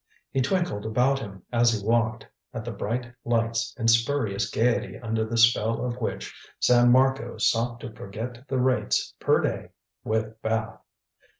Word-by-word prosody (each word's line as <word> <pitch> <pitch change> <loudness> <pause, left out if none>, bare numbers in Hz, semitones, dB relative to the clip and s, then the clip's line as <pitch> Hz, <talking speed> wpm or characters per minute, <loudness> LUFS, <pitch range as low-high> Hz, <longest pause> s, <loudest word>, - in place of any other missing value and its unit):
He 135 - +1
twinkled 160 - 0
about 125 +5 +2
him 95 -7 -9
as 120 -1 +4
he 105 -2 -4
walked 115 0 +1 0.3
at 110 - -5
the 120 - -4
bright 120 +4 -4
lights 115 -1 0
and 115 -2 -1
spurious 115 -3 +2
gaiety 115 +3 0
under 110 -1 -2
the 115 +1 -3
spell 115 0 +3
of 125 -1 -3
which 110 - -4 0.3
San 120 0 +5
Marco 130 -1 +2
sought 120 +1 +1
to 115 - -7
forget 115 +6 -7
the 130 0 -1
rates 130 0 +1
per - - +3
day - - -2 0.3
with 110 0 -2
bath. 110 0 -2
115 Hz, 160 wpm, -26 LUFS, 110-125 Hz, 0.3 s, San